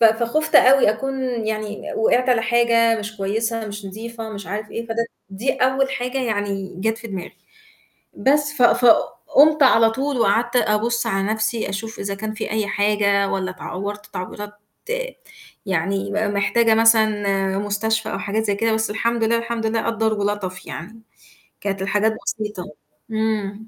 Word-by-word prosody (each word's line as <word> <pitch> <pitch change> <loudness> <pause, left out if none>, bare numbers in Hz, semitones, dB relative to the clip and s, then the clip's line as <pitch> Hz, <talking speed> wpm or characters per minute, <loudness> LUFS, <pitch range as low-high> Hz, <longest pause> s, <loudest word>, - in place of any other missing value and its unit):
ف 230 - +5
فخُفت 235 +8 +2
أوي 265 -4 +6
أكون 270 +4 -3 0.2
يعني 215 -1 -4
وِقعت 245 +3 +2
على 240 -3 +3
حاجة 230 -1 +3
مش 215 +1 -6
كويسة 220 +3 -2
مش 205 -1 -7
نضيفة 225 +3 -7
مش 200 -4 -7
عارف 210 +3 -5
إيه، 230 0 -5
فده 230 0 -1 0.3
دي 220 +8 -1
أول 265 +1 +1
حاجة 250 +1 -2
يعني 205 -5 -2
جات 225 +2 0
في - - -9
دماغي، 190 -3 -7 0.8
بس 290 +2 +2
ف 280 - -1
فقُمت 285 +5 +4
على 225 -4 +6
طول 270 +2 -2
وقعدت 235 +3 +2
أبُص 235 +1 +1
على 195 -3 0
نفْسي 220 0 -1
أشوف 220 +3 -5
إذا 200 0 -3
كان 215 +2 -5
فيه 220 - -5
أي 215 -1 0
حاجة 200 -1 +2
والّا 190 -1 -2
اتعورت 200 +3 -6
تعويرات 205 +3 -7 1.1
يعني 195 +3 -1
م 210 0 0
محتاجة 225 +3 +3
مثلًا 210 -4 +3
مستشفى 215 +2 -1
أو - - -2
حاجات 215 +2 -1
زي 205 -2 +1
كده، 225 +1 +1
بس 220 -1 -1
الحمد 230 +2 0
لله، 230 +1 +2
الحمد 230 -1 -3
لله 225 0 0
قدَّر 225 -1 +1
ولَطَف 205 -3 -3
يعني، 220 +7 -8 0.6
كانت 195 -1 -3
الحاجات 210 +3 +1
بسيطة. 210 -4 -3 0.5
إمم. 220 -1 -2
220 Hz, 155 wpm, -21 LUFS, 205-230 Hz, 1.1 s, أوي